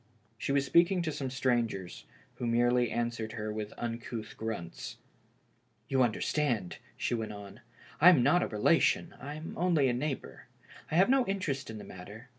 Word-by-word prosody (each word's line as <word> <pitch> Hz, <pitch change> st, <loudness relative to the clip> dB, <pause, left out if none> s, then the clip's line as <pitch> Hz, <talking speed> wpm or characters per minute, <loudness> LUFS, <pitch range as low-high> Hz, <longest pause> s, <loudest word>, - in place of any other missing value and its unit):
She 115 Hz, -, -3 dB
was 140 Hz, 0 st, +2 dB
speaking 175 Hz, +4 st, +4 dB
to 160 Hz, -, -1 dB
some 135 Hz, -3 st, -3 dB
strangers, 120 Hz, -8 st, -1 dB, 0.3 s
who 120 Hz, -, -2 dB
merely 120 Hz, +1 st, +3 dB
answered 115 Hz, -2 st, -2 dB
her 110 Hz, -1 st, -4 dB
with 105 Hz, -1 st, -4 dB
uncouth 115 Hz, -1 st, -5 dB
grunts. 105 Hz, -7 st, -5 dB, 0.9 s
"You 135 Hz, -1 st, +2 dB
understand," 120 Hz, -, 0 dB, 0.2 s
she -, -, -1 dB
went 110 Hz, -2 st, -2 dB
on, 100 Hz, +1 st, -10 dB, 0.2 s
" -, -, -21 dB
I 175 Hz, -, +10 dB
am 155 Hz, -9 st, +6 dB
not 175 Hz, +7 st, +4 dB
a -, -, 0 dB
relation, 105 Hz, -1 st, +2 dB
I'm 150 Hz, +4 st, -6 dB
only 170 Hz, -6 st, +3 dB
a -, -, +1 dB
neighbor. 135 Hz, +2 st, -4 dB, 0.4 s
I -, -, -2 dB
have 185 Hz, +3 st, +6 dB
no 270 Hz, -1 st, +5 dB
interest 150 Hz, -10 st, -2 dB
in 110 Hz, -, -6 dB
the -, -, -8 dB
mat 90 Hz, -1 st, -10 dB
ter. 110 Hz, +5 st, -11 dB
120 Hz, 175 wpm, -31 LUFS, 110-145 Hz, 0.9 s, I